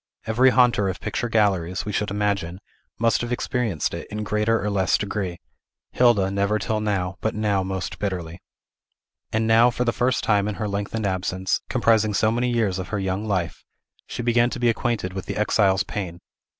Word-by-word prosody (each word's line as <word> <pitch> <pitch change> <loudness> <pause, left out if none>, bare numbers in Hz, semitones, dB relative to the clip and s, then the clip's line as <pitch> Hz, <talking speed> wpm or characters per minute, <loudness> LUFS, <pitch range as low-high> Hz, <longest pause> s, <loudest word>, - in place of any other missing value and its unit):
Every 120 +4 +4
haunter 120 -6 +3
of 95 - -4
picture 120 - -3
galleries, 95 -5 +1
we 105 - -3
should 105 0 -1
imagine, 100 -4 -1 0.4
must 115 0 +2
have 120 0 -4
experienced 120 - -1
it, - - -6
in 105 0 -4
greater 105 +2 +1
or 105 - -2
less 95 -3 +2
degree; 100 -4 -3 0.5
Hilda 110 -6 +3
never 100 +2 +1
till 110 +1 -1
now, 95 -3 -1
but 110 - -1
now 105 -2 +1
most 95 -1 -4
bitterly. 90 -4 -4 0.9
And 110 +1 0
now, 115 +2 +5
for 125 0 -1
the 115 - +1
first 125 0 0
time 105 -2 +2
in 105 - -3
her 105 - -3
lengthened 100 +2 -3
absence, 95 0 -1
comprising 110 -2 +2
so 110 +2 +3
many 120 +2 0
years 110 -6 0
of 95 - -5
her 105 - -3
young 95 +2 -2
life, 90 -5 -2 0.4
she 120 - -5
began 120 0 +3
to 125 - -5
be 120 -1 +3
acquainted 115 -5 -1
with 95 -1 -6
the - - -4
exile's 100 -3 +2
pain. 90 -5 -5
105 Hz, 190 wpm, -23 LUFS, 95-115 Hz, 0.9 s, now